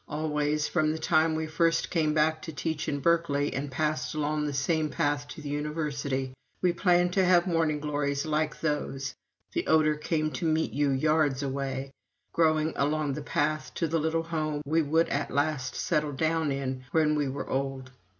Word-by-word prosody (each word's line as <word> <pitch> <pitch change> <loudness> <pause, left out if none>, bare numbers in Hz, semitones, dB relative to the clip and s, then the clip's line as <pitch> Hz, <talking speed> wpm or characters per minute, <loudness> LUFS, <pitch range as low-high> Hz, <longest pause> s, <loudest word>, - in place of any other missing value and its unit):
Always, 150 0 0
from 155 -3 +1
the 160 - -2
time 160 0 +2
we 160 0 -1
first 165 +1 +1
came 155 -3 +1
back 155 +1 +2
to 160 - -6
teach 155 0 -3
in 140 -1 -2
Berkeley 145 -2 +2
and 140 +1 -3
passed 135 -2 -1
along 150 0 0
that 145 - -3
same 155 +2 +1
path 145 0 -1
to 150 - -9
the 145 - -6
University, 145 -3 -2 0.3
we 180 -1 +2
planned 175 0 +3
to 190 - +3
have 180 -1 +5
morning 165 -4 +1
glories 145 -1 -1
like 155 0 -1
those 135 -3 -2 0.4
the - - -1
odor 155 -1 +4
came 155 0 -1
to 170 - -4
meet 160 0 +1
you 145 0 +2
yards 145 0 +2
away 135 0 -3 0.4
growing 155 -1 +2
along 150 0 +1
the 150 - -4
path 155 +1 -1
to 165 - 0
the 165 +1 0
little 160 +1 0
home 155 -3 -2
we 160 +3 +2
would 160 +2 +2
at 145 0 -1
last 140 -2 -1
settle 150 -3 0
down 160 +1 0
in 130 -1 -3
when 155 -2 +3
we 145 -2 0
were 135 - -5
old. 135 -1 -3
150 Hz, 185 wpm, -28 LUFS, 145-160 Hz, 0.4 s, have